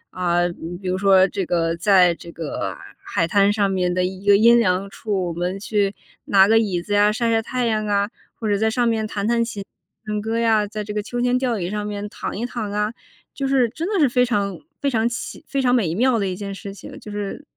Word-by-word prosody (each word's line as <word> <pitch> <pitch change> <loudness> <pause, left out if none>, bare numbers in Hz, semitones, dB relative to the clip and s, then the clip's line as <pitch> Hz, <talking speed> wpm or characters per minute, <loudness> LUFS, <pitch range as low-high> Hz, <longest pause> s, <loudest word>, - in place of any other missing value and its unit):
啊， 175 -1 +1
比 175 0 -7
比 185 - -4
如 185 - 0
说 190 -1 +5
这 195 -1 -3
个 165 -1 0
在 180 0 +4
这 170 0 -11
个 165 -3 -4 0.3
海 165 - 0
滩 200 +3 +3
上 205 -1 +1
面 180 -2 0
的 185 - +1
一 190 +2 -6
个 200 - +8
阴 235 +2 +6
凉 190 -2 +1
处， 195 -5 -2
我 - - -4
们 180 +3 -3
去 205 -1 0 0.3
拿 195 -1 +5
个 225 +1 +5
椅 190 -6 -1
子 205 +2 -4
呀 205 +1 +4
晒 230 +1 0
晒 225 - +2
太 250 +2 -2
阳 215 -2 0
啊， 205 +1 +1 0.2
或 225 - -4
者 205 -1 +1
在 220 +1 +2
上 240 +1 +1
面 220 -1 0
弹 200 -1 -3
弹 235 0 +2
琴 210 -4 -6 0.4
唱 210 0 -2
歌 225 +2 -2
呀， 220 -3 +2
在 215 0 -5
这 210 0 -6
个 210 - -1
秋 240 +4 -5
千 245 +1 +2
吊 245 -4 -1
椅 175 0 -3
上 210 0 -3
面 205 0 -4
躺 200 - -5
一 235 - -2
躺 235 -4 -4
啊。 210 +2 -1 0.4
就 270 -1 -2
是 260 -3 +3
真 315 +9 -5
的 385 - +1
是 290 - +5
非 250 0 +2
常 205 -3 -1 0.2
非 280 - 0
常 230 -2 +1
奇 245 +5 -6
非 275 -2 -1
常 250 -1 +3
美 185 -10 +1
妙 240 +3 +2
的 200 - 0
一 185 -1 -3
件 200 -1 -5
事 195 0 -8
情， - - -11
就 210 - -9
是 205 +6 -5
210 Hz, 265 characters per minute, -22 LUFS, 190-230 Hz, 0.4 s, 个